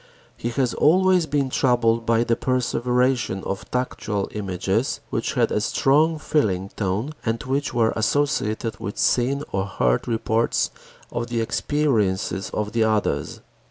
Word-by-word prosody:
He 120 - -3
has 125 0 0
always 180 +1 +4
been 140 -3 0
troubled 115 -3 +2
by 115 0 +3
the 120 -1 +1
"perseveration" 125 -3 0
of 100 +1 -5
tactual 105 -5 -2
images 100 +3 -1
which - - -2
had - - +2
a - - +1
strong 155 +4 +2
feeling 100 -12 0
tone 105 +8 -2
and 115 0 -2
which 140 +2 -1
were 115 -2 +2
associated 115 -3 0
with 100 - -5
seen 135 +4 +1
or 95 0 -1
heard - - 0
reports 115 0 0 0.4
of 120 0 -3
the 120 -1 -2
experiences 110 -7 0
of 105 +1 -3
others. 110 -2 0
115 Hz, 135 wpm, -23 LUFS, 105-135 Hz, 0.4 s, always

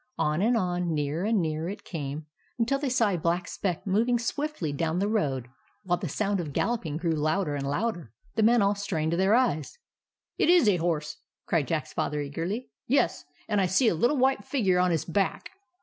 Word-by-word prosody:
On 150 +3 +1
and 230 +3 +3
on, 180 -4 -1
nearer 150 +5 -1
and 220 -1 +2
nearer 160 +1 -2
it 200 - -7
came, 150 -2 -5 0.3
until 250 +4 +1
they 285 -2 -1
saw 235 -4 +3
a 185 - 0
black 170 +2 0
speck 180 -5 -3
moving 225 +5 +2
swiftly 235 - -2
down 160 +3 -1
the 200 +2 +1
road, 140 - 0 0.4
while 175 -1 0
the 180 - -4
sound 200 +5 0
of 155 -5 -4
galloping 175 - -1
grew 170 0 -1
louder 155 +2 0
and 140 -1 -2
louder. 175 - -2 0.2
The 220 - 0
men 230 0 +5
all 200 +1 +3
strained 170 -6 -2
their 190 +5 +3
eyes. 195 - 0 0.3
" - - -64
It - - +3
is 350 -9 +6
a 200 -3 +4
horse! 155 -3 -2 0.2
" - - -65
cried 155 -6 +1
Jack's 155 +1 -2
Father, 150 +1 -1
eagerly. 165 - -4 0.2
"Yes, 255 -9 +1 0.2
and 210 -2 +1
I 185 - +2
see 195 +7 +3
a - - +1
little 240 - +2
white 265 -4 +2
figure 195 -8 +1
on 180 0 +3
his 165 -3 0
back. 195 - -1
180 Hz, 210 wpm, -27 LUFS, 155-220 Hz, 0.4 s, is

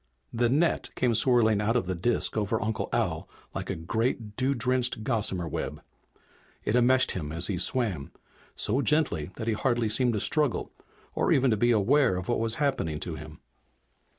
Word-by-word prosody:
The 120 0 +1
net 155 +6 +1
came 125 -2 +1
swirling 110 -2 +4
out 110 +3 0
of 120 - +1
the 95 - -2
disk 105 +7 -1
over 110 +1 0
Uncle 110 0 -2
Al - - -1 0.2
like - - -5
a - - -1
great, 110 +4 -2
dew 135 +3 0
drenched 125 -2 0
gossamer 105 -7 -1
web. - - -5 0.8
It 105 - +1
enmeshed 130 +2 +4
him 75 -5 -4
as 85 +3 -2
he 95 -4 -2
swam, 100 - +1 0.4
so 125 +6 +1
gently 140 - +1
that 110 - -5
he 115 - +2
hardly 120 0 0
seemed 120 +2 +1
to 105 - -1
struggle 150 +1 0 0.4
or - - 0
even 130 -1 +3
to - - +3
be 120 +3 +2
aware 120 +1 +3
of 95 +3 -6
what 120 - +1
was 115 0 -1
happening 135 - -1
to - - -4
him. - - -10
115 Hz, 180 wpm, -27 LUFS, 105-125 Hz, 0.8 s, swirling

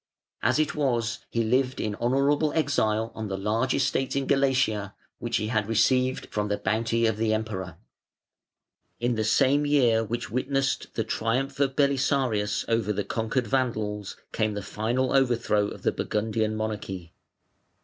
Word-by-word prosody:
As - - +2
it 155 -1 +1
was, 120 -6 0
he 115 - 0
lived 125 +3 +1
in 105 - -1
honourable 140 +7 +2
exile 115 -8 +1
on 110 -1 -5
the 95 -1 -3
large 110 +6 0
estates 135 0 0
in 140 -1 0
Galatia, 130 -8 +1 0.2
which - - -1
he 110 - -2
had 110 -3 0
received 130 +3 +2
from 105 -1 0
the 105 0 -1
bounty 115 +3 0
of 110 -2 +1
the 110 0 +1
Emperor. 100 -4 -4 1.2
In 120 +1 +1
the 110 -1 0
same 135 +6 +3
year 135 -6 +4
(534) 115 - -1
which 120 -2 -3
witnessed 135 +2 0
the 115 - 0
triumph 125 +5 -1
of 135 -2 +1
Belisarius 130 -6 +1
over 115 -2 +1
the 105 0 -1
conquered 115 +4 -1
Vandals 105 -5 -1
came 110 -2 0
the 100 - -4
final 120 +7 -1
overthrow 120 -6 +2
of - - -9
the - - +2
Burgundian 110 0 -1
monarchy. 105 -5 -4
115 Hz, 160 wpm, -26 LUFS, 105-130 Hz, 1.2 s, year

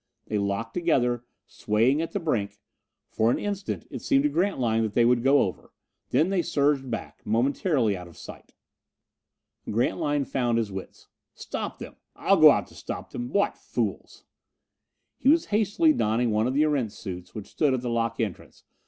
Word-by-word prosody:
They 105 - -1
locked 100 +3 -2
together, 125 -9 +1 0.2
swaying 115 +8 +1
at 165 - -4
the 200 - -2
brink. 120 - -2 0.5
For 110 +1 +2
an - - +2
instant 200 -2 -4
it - - -6
seemed 275 -1 +2
to 295 - +3
Grantline 130 - +1
that 110 -2 -2
they 120 - +4
would 120 0 +3
go 135 +3 +4
over; 95 - -6 0.4
then 160 +5 +2
they 195 -2 +1
surged 140 -4 +1
back, 115 - -6
momentarily 125 - +1
out 90 -1 -8
of 85 - -16
sight. - - -12 1.1
Grantline 145 +5 0
found 120 -3 0
his 110 -3 -1
wits. 95 -1 -9 0.3
"Stop - - -5
them! - - -10 0.2
I'll - - +3
go - - +11
out - - +2
to - - -17
stop - - -7
them! 120 0 -5
What 200 +6 +1
fools!" - - -4 1.0
He 265 - +3
was 325 +2 +4
hastily 220 - +3
donning 115 - +1
one 110 +2 +1
of 130 - -2
the 150 - +4
Erentz 135 -9 0
suits 90 -4 -8
which 105 -3 -6
stood 145 -4 +1
at 125 - -3
the 125 - -3
lock 115 0 -1
entrance. 105 -7 -5
125 Hz, 180 wpm, -26 LUFS, 110-155 Hz, 1.1 s, go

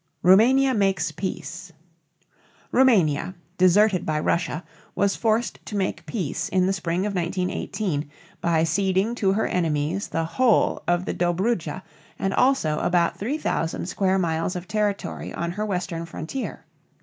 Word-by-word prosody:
ROUMANIA 255 +9 +5
MAKES 195 -6 +1
PEACE. 170 +1 -6 1.0
Roumania, 190 - +3 0.2
deserted 185 +1 +4
by 155 -1 -1
Russia, 170 +1 -1 0.3
was 200 0 +2
forced 225 +1 0
to 210 - -5
make 170 -4 -2
peace 165 -3 -3
in 185 0 +2
the 190 - +1
spring 180 0 -1
of 210 - -2
1918, 180 -2 -2 0.3
by 165 -2 +2
ceding 190 +5 +1
to 200 -5 +1
her 215 - +1
enemies 165 +2 -1
the 165 0 -1
whole 240 +6 +2
of 175 +1 +1
the - - -2
Dobrudja 180 -1 -1 0.3
and 195 0 -1
also 250 - +2
about 175 -1 +1
3000 220 - -2
square 190 +1 +1
miles 165 0 -1
of 180 0 -6
territory 210 -1 -2
on 170 0 -2
her 210 +4 -3
western 175 -3 -3
frontier. 170 - -6
185 Hz, 135 wpm, -24 LUFS, 165-205 Hz, 1.0 s, ROUMANIA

